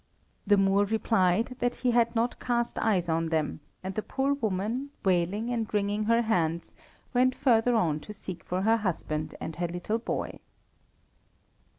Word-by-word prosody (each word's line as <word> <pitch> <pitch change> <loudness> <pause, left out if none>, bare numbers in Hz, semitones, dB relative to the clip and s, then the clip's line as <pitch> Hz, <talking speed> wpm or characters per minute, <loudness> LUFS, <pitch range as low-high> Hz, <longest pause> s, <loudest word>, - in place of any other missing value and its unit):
The 205 0 +5
Moor 195 +1 +3
replied 220 +2 +1
that 245 0 0
he 250 -1 0
had 235 0 +2
not 230 +2 0
cast 240 -1 0
eyes 190 -6 +1
on 165 0 0
them, 155 -2 -1 0.2
and 190 +1 -4
the 215 - -2
poor 270 +5 0
woman, 225 +2 -2 0.2
wailing 190 +6 +1
and 230 -3 -2
ringing 205 0 0
her 230 +2 +3
hands, 170 -6 0 0.4
went 255 +1 +3
further 245 -3 +3
on 160 -9 +2
to 210 - -10
seek 190 -3 -8
for 185 +1 -2
her 225 +2 +4
husband 155 -6 -3
and 160 - -6
her 175 0 0
little 175 +6 -2
boy. 230 - -4
210 Hz, 165 wpm, -28 LUFS, 180-235 Hz, 0.4 s, The